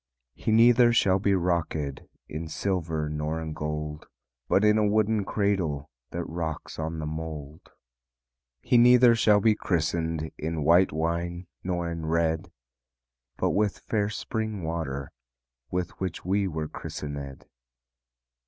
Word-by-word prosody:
"He 110 - -2
neither 120 +2 +6
shall 95 -4 +3
be 100 0 +2
rockéd 85 -6 -1 0.2
In 80 +2 -5
silver 80 -3 -2
nor 75 +1 -2
in 80 -1 -5
gold, 75 0 -4 0.4
But 100 - +4
in 105 +1 +5
a - - +3
wooden 110 0 +2
cradle 90 -10 -1 0.2
That 85 - -3
rocks 80 -2 -5
on 80 +1 -3
the 80 - -4
mould. 80 -1 -6 0.9
"He 120 -1 +4
neither 125 0 +7
shall 105 -2 +4
be 110 +2 +4
christened 80 -3 -1
In 80 0 -2
white 85 +5 +5
wine 85 +3 -2 0.2
nor 90 -2 -1
in 85 -1 -4
red, 80 +2 0 0.9
But - - +1
with 105 -1 +1
fair 105 -2 -1
spring 110 -2 -3
water 80 -4 -3 0.6
With 90 +2 -2
which 95 -3 -4
we 100 +2 +1
were 80 -3 -3
christenéd." 70 -3 -7
85 Hz, 135 wpm, -27 LUFS, 80-100 Hz, 0.9 s, neither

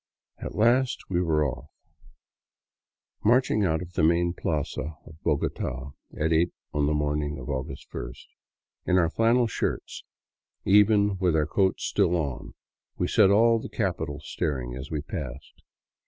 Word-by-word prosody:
At - - -6
last 120 +1 +2
we 90 -1 +2
were 80 -3 +2
off, 65 -3 -5 1.5
marching 120 -2 +3
out 80 -2 +1
of 90 0 -12
the - - 0
main 85 +2 +3
plaza 75 -1 -3
of 80 +1 -15
Bogota 70 -3 -2 0.3
at 80 +1 +2
eight 85 +2 +3 0.2
on 75 -1 +1
the 75 - +1
morning 75 0 -1
of 75 - -5
August 65 -2 -5
first. 60 +1 -7 0.6
In 90 - +4
our 85 -2 +3
flannel 115 +4 +3
shirts, 115 - -3 0.6
even 105 0 +4
with 90 -4 +2
our 75 -1 +2
coats 95 +4 +1
still 90 -4 +2
on, 65 -7 -3 0.4
we 90 - 0
set 105 -1 +5
all 115 +3 +5
the - - -7
capital 90 -8 -2
staring 65 -4 -3
as 65 +2 -7
we 75 -2 -2
passed. 70 -4 -7
80 Hz, 150 wpm, -26 LUFS, 75-100 Hz, 1.5 s, set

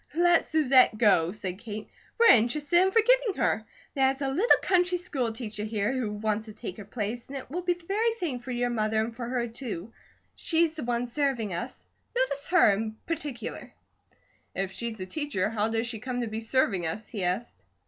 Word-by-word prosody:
"Let 345 0 +4
Susette 265 -7 +4
go!" 190 -7 +4
said 185 -2 -5
Kate. 215 -2 -7 0.3
"We're 465 - +9
interested 295 +9 +3
in 380 - +4
forgetting 460 0 +3
her. - - +1 0.3
There's 270 -1 +2
a 270 - 0
little 365 - +4
country 360 -1 +2
school 275 -10 -2
teacher 215 -2 -6
here, 215 +2 -1
who 250 -5 -2
wants 215 +1 -1
to 215 - -10
take 190 -3 -7
her 210 - -8
place, 225 +3 -4
and 275 - -6
it 260 - -9
will 355 +4 -2
be 355 0 +1
the 345 -1 -17
very 435 +5 +1
thing 325 - -3
for 245 +2 -11
your 245 0 0
mother 220 -1 0
and 225 +1 -2
for 235 -1 -5
her, 245 -1 -1
too. 230 -4 -6 0.4
She's 330 -1 +1
the 310 -3 -6
one 240 0 0
serving 245 -5 -1
us; 170 - -6 0.3
notice 390 - 0
her 355 - +6
in 220 +2 -3
particular." 295 -7 -5 0.8
"If 195 -1 -2
she's 220 +2 -5
a 185 - -4
teacher, 215 -4 -2
how 215 0 0
does 225 +1 0
she 235 -2 -5
come 245 +2 -3
to 235 - -2
be 220 +1 -4
serving 220 -7 +1
us?" 215 +7 -5
he 205 -6 -4
asked. 185 +7 -2
240 Hz, 200 wpm, -28 LUFS, 215-300 Hz, 0.8 s, We're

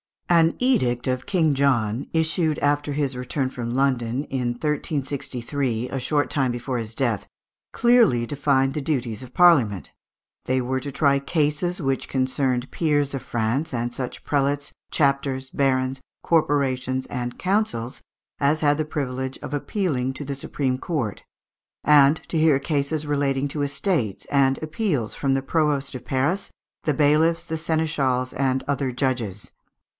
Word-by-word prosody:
An 165 -1 +4
edict 125 - +2
of 130 -1 -2
King 165 -6 +2
John, 130 -4 +1
issued 160 -1 +1
after 145 0 +1
his 140 -2 -1
return 130 +2 -2
from 120 -1 -4
London 130 -1 +1
in 125 -2 -1
1363, 135 -3 -2
a 135 - -3
short 145 +3 0
time 135 -4 +1
before 120 +1 -3
his 115 0 -5
death, 115 -6 0 0.5
clearly 230 - +4
defined 135 0 +1
the 150 - -2
duties 125 -7 -2
of 130 -1 -10
Parliament. 130 - +4 0.5
They 130 +1 +1
were 130 +1 -1
to 140 +2 -6
try 140 0 +3
cases 155 +5 0
which 135 -2 -1
concerned 130 -1 0
peers 145 -4 +1
of 135 - -3
France, 120 +5 -1
and 120 0 -2
such 125 -1 -5
prelates, 145 0 0 0.2
chapters, 140 -2 0
barons, 130 -1 0 0.2
corporations, 130 -5 +1
and 120 -1 -4
councils 185 - -1 0.4
as 145 +2 +2
had 145 0 +3
the 155 - 0
privilege 130 -3 -3
of 145 - -7
appealing 145 -5 -1
to 145 +2 -6
the 140 - -3
supreme 135 -1 -2
court; 135 - -3 0.6
and 150 +1 +6
to 165 - 0
hear 155 -3 +5
cases 145 +1 -1
relating 140 -1 0
to 145 +1 -3
estates, 140 - -1
and 135 -1 +3
appeals 155 - -1
from 135 -1 0
the 135 - -1
provost 145 -3 0
of 125 -1 -8
Paris, 140 +11 0 0.4
the 150 - +2
bailiffs, 155 +3 +2
seneschals, 145 -6 0
and 130 -1 0
other 140 -2 0
judges 120 -6 -2
(Fig. - - -19
140 Hz, 150 wpm, -24 LUFS, 130-150 Hz, 0.6 s, and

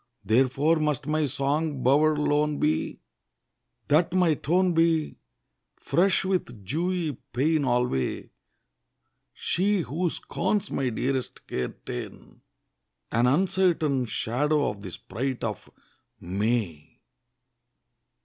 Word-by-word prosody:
Therefore 135 +7 +3
must 150 -4 -1
my 155 0 +1
song 140 +1 -1
bower 150 +4 +4
lone 150 0 +1
be, 80 - -1 0.9
That 165 +4 +3
my 180 -3 +4
tone 180 +5 +1
be 165 -2 +1 0.6
Fresh 190 +2 +1
with 125 - -2
dewy 165 - -1 0.2
pain 145 +4 +2
alway; 120 - 0 1.0
She, 195 +2 0
who 170 +4 -1
scorns 205 +4 -2
my 130 -2 0
dearest 130 +2 -3
care 65 - -3
ta'en, - - -8 0.7
An 120 +2 +3
uncertain 165 -4 +2
Shadow 140 +8 0
of 100 -1 -11
the 95 - -7
sprite 120 +9 -4
of 105 -4 -4 0.5
May. 100 -4 -2
145 Hz, 100 wpm, -26 LUFS, 125-165 Hz, 1.0 s, bower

